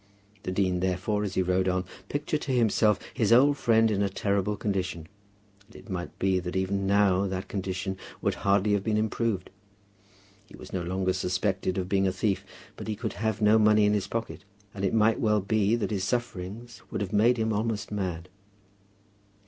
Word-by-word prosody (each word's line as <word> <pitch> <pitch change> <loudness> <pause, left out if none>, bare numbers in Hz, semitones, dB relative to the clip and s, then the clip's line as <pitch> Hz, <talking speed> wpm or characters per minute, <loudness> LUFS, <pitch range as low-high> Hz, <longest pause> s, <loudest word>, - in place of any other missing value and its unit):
The 90 - -4
dean, 95 -1 +1
therefore, 95 +3 -1
as 100 -2 -4
he 95 - +2
rode 90 +1 +1
on, 90 0 0 0.2
pictured 150 +1 -2
to 135 - -3
himself 110 -3 +3 0.2
his 115 -4 +1
old 140 +5 +6
friend 115 -4 +3
in 100 -1 0
a 100 - +1
terrible 100 +1 -1
condition. 95 -6 -2 0.6
And 115 - -21
it 110 - -11
might 90 -1 -5
be 95 -1 +1
that 90 0 -5
even 95 +1 0
now 100 -1 +3
that 95 0 -4
condition 95 0 -3 0.2
would - - 0
hardly 100 +1 +3
have 100 -1 +1
been 110 0 0
improved. 110 -3 -1 1.0
He - - -13
was - - -12
no 95 - -1
longer 95 +1 -1
suspected 95 +1 -1
of 90 -1 -1
being 95 0 +2
a - - +1
thief; 95 +1 -1 0.3
but - - -7
he 110 - -2
could 110 +1 -4
have 110 -1 -2
no 105 +1 +6
money 105 -1 +5
in 105 - +3
his 100 -2 0
pocket; 115 +2 -4 0.3
and 95 - -6
it 100 - +1
might 110 0 +3
well 105 -1 +2
be 105 +2 +1
that 115 -1 -2
his 100 -3 -1
sufferings 110 +1 -4
would - - -3
have 100 0 -3
made 115 +4 +4
him 110 -1 0
almost 105 -1 -2
mad. 90 -4 -3
100 Hz, 195 wpm, -27 LUFS, 95-110 Hz, 1.0 s, old